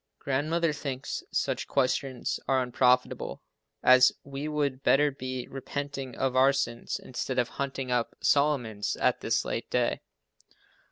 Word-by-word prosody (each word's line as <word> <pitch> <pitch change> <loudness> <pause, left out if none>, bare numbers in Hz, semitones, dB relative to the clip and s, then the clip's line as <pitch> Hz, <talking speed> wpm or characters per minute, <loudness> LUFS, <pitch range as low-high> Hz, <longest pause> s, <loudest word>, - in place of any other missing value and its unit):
Grandmother 155 +4 0
thinks 135 -3 -4
such - - -1
questions 130 -1 0
are 130 -1 +3
unprofitable, 125 0 +1 0.4
as 130 0 +7
we 140 +2 -5
would 145 -3 -1
better 145 +2 +4
be 130 -2 -5
repenting 135 0 -5
of 130 -1 -1
our 130 +1 +6
sins, 120 -4 -2
instead 130 +1 -4
of 120 -1 +2
hunting 135 -2 -4
up 120 -1 0
Solomon's 130 -8 +1
at - - +1
this - - 0
late - - -3
day. - - 0
135 Hz, 130 wpm, -28 LUFS, 125-140 Hz, 0.4 s, as